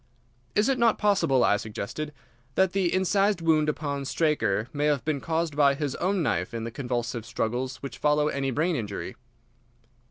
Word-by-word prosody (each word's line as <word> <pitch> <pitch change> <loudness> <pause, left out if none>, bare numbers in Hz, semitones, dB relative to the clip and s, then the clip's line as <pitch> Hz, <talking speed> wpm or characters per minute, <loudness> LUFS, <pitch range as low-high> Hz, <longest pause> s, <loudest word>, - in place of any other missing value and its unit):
"Is 210 - +3
it 270 -2 +1
not 230 -2 +4
possible," 195 -11 +3
I 105 - +4
suggested, 110 +8 -5 0.4
"that 190 -1 +3
the 190 -3 +1
incised 195 +1 +2
wound 155 -2 +3
upon 145 -2 -2
Straker 120 -9 +1
may 145 0 0
have 145 -5 +1
been 150 -3 -1
caused 165 -2 -1
by 140 -2 +4
his 140 -1 -2
own 185 0 0
knife 90 - -1
in 115 - -3
the 115 - -4
convulsive 120 -2 -3
struggles 125 +3 -2
which 140 - -7
follow 150 0 +3
any 140 -2 -1
brain 160 +7 0
injury?" 105 -6 -4
150 Hz, 170 wpm, -27 LUFS, 125-170 Hz, 0.4 s, not